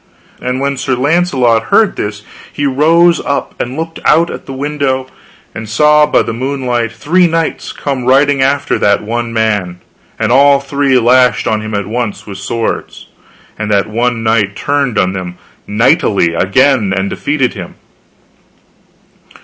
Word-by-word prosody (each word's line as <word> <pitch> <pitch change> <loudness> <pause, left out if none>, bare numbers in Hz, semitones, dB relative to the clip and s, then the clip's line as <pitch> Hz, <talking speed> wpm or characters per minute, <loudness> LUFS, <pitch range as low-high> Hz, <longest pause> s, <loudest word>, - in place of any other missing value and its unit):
And 125 +1 -2
when 140 0 -2
Sir 130 0 -1
Launcelot 130 -5 +1
heard 210 - +2
this 105 0 -5 0.3
he 145 - -3
rose 165 +5 +3
up, 140 - -2
and 125 +3 -5
looked 165 0 -5
out 170 +1 +3
at - - -9
the - - -7
window, 135 -1 -2 0.5
and 110 -1 -7
saw 150 +6 +4
by - - +2
the - - -4
moonlight 125 -2 -2
three 175 +10 +2
knights 165 0 -2
come 135 -4 -4
riding 135 +2 +3
after 140 +2 0
that 100 0 +2
one 115 +2 -3
man, 105 -6 -1 0.4
and 110 0 -1
all 140 +2 +5
three 140 -1 0
lashed 125 +1 +3
on 110 -1 0
him 110 0 -5
at 100 -1 -2
once 110 0 -4
with 100 -2 -8
swords, 115 +3 -4 0.5
and 110 0 -3
that 100 -1 +2
one 115 +1 -1
knight 110 -3 +1
turned 140 -5 -1
on 95 0 +1
them 90 -2 -6 0.3
knightly 105 -5 +2
again 105 +4 +2
and 95 +1 -1
defended 140 -4 -1
him. 90 -5 -9
125 Hz, 155 wpm, -13 LUFS, 110-140 Hz, 0.5 s, all